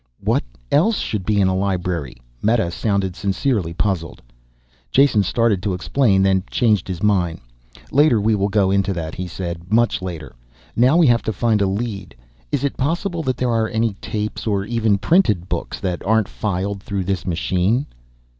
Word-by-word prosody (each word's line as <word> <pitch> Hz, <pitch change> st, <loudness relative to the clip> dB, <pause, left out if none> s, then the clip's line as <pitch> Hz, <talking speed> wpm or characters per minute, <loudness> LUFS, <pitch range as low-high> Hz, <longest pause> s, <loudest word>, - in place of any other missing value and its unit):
"What -, -, +1 dB, 0.3 s
else 205 Hz, +9 st, +3 dB
should 100 Hz, -4 st, -3 dB
be 105 Hz, -1 st, +2 dB
in 95 Hz, -, +4 dB
a 95 Hz, -, +1 dB
library?" 90 Hz, -8 st, -2 dB, 0.2 s
Meta 110 Hz, -5 st, +1 dB
sounded 100 Hz, -1 st, -1 dB
sincerely 100 Hz, -, -1 dB
puzzled. 85 Hz, -2 st, -2 dB, 0.7 s
Jason 135 Hz, -6 st, +4 dB
started 105 Hz, 0 st, +1 dB
to 95 Hz, -1 st, -1 dB
explain, 100 Hz, -1 st, +2 dB
then 95 Hz, -1 st, +3 dB
changed 105 Hz, -6 st, +1 dB
his 90 Hz, -1 st, -5 dB
mind. 90 Hz, -6 st, +1 dB, 0.5 s
"Later 140 Hz, -5 st, +4 dB
we 110 Hz, +2 st, +2 dB
will 100 Hz, -1 st, +1 dB
go 100 Hz, -2 st, +2 dB
into 100 Hz, 0 st, +1 dB
that," 80 Hz, -3 st, -5 dB
he 90 Hz, 0 st, -5 dB
said. 85 Hz, 0 st, -6 dB
"Much 115 Hz, -3 st, +2 dB
later. 85 Hz, -5 st, -6 dB, 0.4 s
Now 130 Hz, +7 st, +4 dB
we 175 Hz, -, +5 dB
have 120 Hz, -3 st, +4 dB
to -, -, -2 dB
find 110 Hz, +1 st, +1 dB
a 100 Hz, -, +3 dB
lead. 100 Hz, -2 st, -4 dB, 0.4 s
Is -, -, -1 dB
it 140 Hz, -, -1 dB
possible 170 Hz, +5 st, -1 dB
that 130 Hz, -5 st, -2 dB
there 125 Hz, -2 st, 0 dB
are 115 Hz, -1 st, +1 dB
any 110 Hz, -1 st, 0 dB
tapes 110 Hz, 0 st, -4 dB
or 100 Hz, -2 st, 0 dB
even 110 Hz, -2 st, +1 dB
printed 105 Hz, -, +2 dB
books -, -, -4 dB
that 90 Hz, -2 st, -3 dB
aren't 110 Hz, 0 st, +2 dB
filed 100 Hz, 0 st, -3 dB
through 100 Hz, -1 st, -3 dB
this 95 Hz, -1 st, -3 dB
machine?" 95 Hz, -, 0 dB
100 Hz, 175 wpm, -20 LUFS, 95-115 Hz, 0.7 s, we